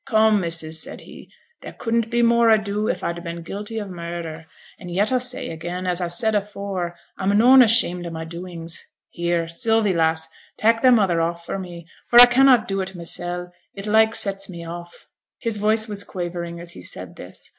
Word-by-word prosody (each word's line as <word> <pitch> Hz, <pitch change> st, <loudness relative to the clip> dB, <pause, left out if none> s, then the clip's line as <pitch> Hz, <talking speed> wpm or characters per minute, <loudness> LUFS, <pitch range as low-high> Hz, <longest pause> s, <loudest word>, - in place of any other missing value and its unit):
come, 220 Hz, -3 st, +4 dB
missus!' 160 Hz, -2 st, 0 dB
said -, -, -4 dB
he, -, -, -14 dB, 0.3 s
'there -, -, -9 dB
couldn't 230 Hz, -1 st, -1 dB
be 240 Hz, 0 st, +1 dB
more 235 Hz, 0 st, +4 dB
ado 210 Hz, -1 st, +1 dB
if -, -, -2 dB
a'd 170 Hz, 0 st, -3 dB
been 170 Hz, -1 st, -7 dB
guilty 205 Hz, +5 st, -6 dB
of 210 Hz, -2 st, -4 dB
murder, 170 Hz, -3 st, -7 dB, 0.3 s
an' 180 Hz, -, -9 dB
yet 200 Hz, +6 st, +2 dB
a 255 Hz, -, +2 dB
say 250 Hz, 0 st, -1 dB
again, 175 Hz, +3 st, -5 dB
as 180 Hz, 0 st, 0 dB
a 175 Hz, -, -2 dB
said 220 Hz, +6 st, +1 dB
afore, 200 Hz, -4 st, -3 dB, 0.2 s
a'm 200 Hz, +1 st, +1 dB
noane 255 Hz, +4 st, +7 dB
ashamed 195 Hz, -7 st, +3 dB
o' -, -, -4 dB
my 160 Hz, -1 st, -6 dB
doings. 170 Hz, -1 st, -7 dB, 0.3 s
Here, 170 Hz, -1 st, -1 dB
Sylvie, 215 Hz, +4 st, +1 dB
lass, 160 Hz, -1 st, +1 dB, 0.3 s
tak' 225 Hz, +1 st, +2 dB
thy 255 Hz, -, +6 dB
mother 195 Hz, -9 st, +3 dB
off 170 Hz, +1 st, -3 dB
me, 175 Hz, -3 st, -6 dB, 0.2 s
for 240 Hz, -, +3 dB
a 245 Hz, -, +13 dB
cannot 250 Hz, -1 st, +4 dB
do 195 Hz, 0 st, -1 dB
it 190 Hz, 0 st, -6 dB
mysel', 175 Hz, +1 st, -5 dB, 0.2 s
it 195 Hz, 0 st, -7 dB
like 220 Hz, +1 st, +3 dB
sets 195 Hz, 0 st, -2 dB
me 170 Hz, -2 st, -8 dB
off.' 175 Hz, +1 st, -9 dB, 0.3 s
His 230 Hz, -3 st, -2 dB
voice 215 Hz, +2 st, +2 dB
was 205 Hz, -2 st, -2 dB
quavering 175 Hz, -2 st, -5 dB
as 170 Hz, 0 st, -6 dB
he -, -, -10 dB
said -, -, -4 dB
this. -, -, -7 dB
185 Hz, 195 wpm, -22 LUFS, 170-220 Hz, 0.3 s, a